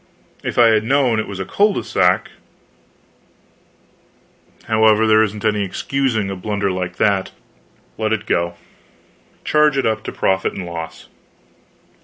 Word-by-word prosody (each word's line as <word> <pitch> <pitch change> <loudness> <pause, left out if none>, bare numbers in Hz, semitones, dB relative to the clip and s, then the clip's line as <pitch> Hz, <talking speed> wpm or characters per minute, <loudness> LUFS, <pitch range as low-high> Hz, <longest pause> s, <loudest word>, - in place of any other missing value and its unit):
If - - -4
I 120 -1 +6
had 110 -1 +3
known 125 -2 +2
it 110 - -3
was 100 -1 -7
a 95 - -3
cul 205 - +2
de - - -3
sac 90 +1 +1 2.3
however, 110 0 +3
there 110 0 +5
isn't 105 0 -2
any 105 -1 +1
excusing 110 0 -1
a - - -4
blunder 100 +1 -2
like 90 -1 -4
that, 100 -2 +1 0.7
let 110 0 0
it 110 -1 -1
go. 85 -3 -1 0.9
Charge 150 -2 +3
it 135 - +1
up 110 -1 0
to - - -4
profit 95 0 0
and 95 - -6
loss. 80 -1 -7
110 Hz, 145 wpm, -19 LUFS, 95-110 Hz, 2.3 s, I